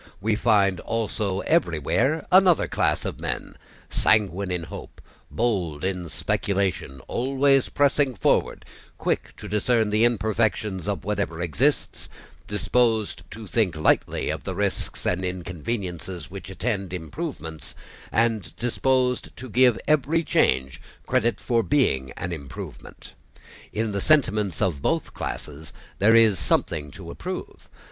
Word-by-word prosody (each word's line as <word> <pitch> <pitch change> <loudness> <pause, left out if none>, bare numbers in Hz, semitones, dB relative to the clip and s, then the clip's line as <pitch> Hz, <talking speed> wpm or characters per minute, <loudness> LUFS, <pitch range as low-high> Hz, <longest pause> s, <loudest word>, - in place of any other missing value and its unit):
We 110 +2 +1
find 100 -5 +3
also 105 -3 -2
everywhere 135 - +1
another 185 -2 +6
class - - 0
of - - -4
men, - - -4 0.4
sanguine 100 -3 +2
in 90 -2 -2
hope, 80 - -9 0.3
bold 95 -10 -1
in 90 -3 -2
speculation, 95 -8 -1
always 135 +1 +2
pressing 140 -2 +2
forward, 95 - +1 0.3
quick - - -2
to - - -8
discern 110 +1 +1
the 105 +2 +3
imperfections 110 -4 0
of - - -2
whatever 80 0 -2
exists, 85 -5 0 0.4
disposed 105 0 +1
to 110 0 -8
think 95 -2 +1
lightly 80 - +1
of - - -5
the - - -4
risks - - -2
and 90 +1 0
inconveniences 90 -1 -4
which 95 -1 -8
attend 100 -2 -2
improvements 80 - -6 0.4
and 110 -8 +1
disposed 125 +1 0
to 130 - -7
give 125 -1 +4
every 155 +3 +2
change 65 - +1 0.2
credit 120 -2 +1
for 120 -2 +1
being 110 - +1
an 90 - -4
improvement. 70 -5 -9 0.6
In 110 0 -1
the 100 -1 -2
sentiments 105 - +2
of 85 -8 0
both - - 0
classes 75 0 -6 0.3
there 110 +4 +5
is 110 -6 +5
something 75 0 0
to - - -9
approve. - - -7
105 Hz, 125 wpm, -25 LUFS, 90-120 Hz, 0.6 s, another